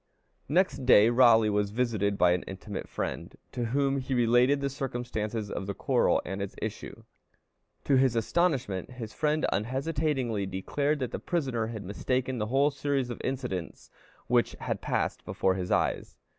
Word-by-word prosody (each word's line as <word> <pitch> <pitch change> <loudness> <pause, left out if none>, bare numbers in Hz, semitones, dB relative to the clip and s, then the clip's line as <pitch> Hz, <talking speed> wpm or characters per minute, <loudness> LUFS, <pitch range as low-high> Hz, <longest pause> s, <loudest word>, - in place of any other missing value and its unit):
Next 150 -5 +2
day 110 -1 +6
Raleigh 115 -3 +5
was 105 0 +1
visited 105 -3 0
by 90 -2 +4
an 90 0 +1
intimate 95 +1 -7
friend, - - -4 0.2
to 120 - -2
whom 140 +3 +1
he 130 0 -2
related 120 +3 +4
the 140 - -1
circumstances 120 -5 -4
of 95 - -4
the 100 - -3
quarrel - - +2
and 95 +2 -4
its 100 - -5
issue. - - -6 0.8
To 140 - +3
his 130 -2 +3
astonishment, 125 - 0
his 115 -4 -7
friend 155 +3 +1
unhesitatingly 130 -2 -1
declared 140 +11 -1
that 125 - -2
the - - -4
prisoner 130 -10 -1
had 110 -3 -6
mistaken 125 +6 -2
the 105 - -1
whole 140 +5 +3
series 135 -2 -1
of 120 - -6
incidents 125 -10 -4 0.3
which - - +2
had - - -3
passed - - -1
before 95 - 0
his 90 -1 -4
eyes. - - 0
120 Hz, 160 wpm, -28 LUFS, 105-135 Hz, 0.8 s, day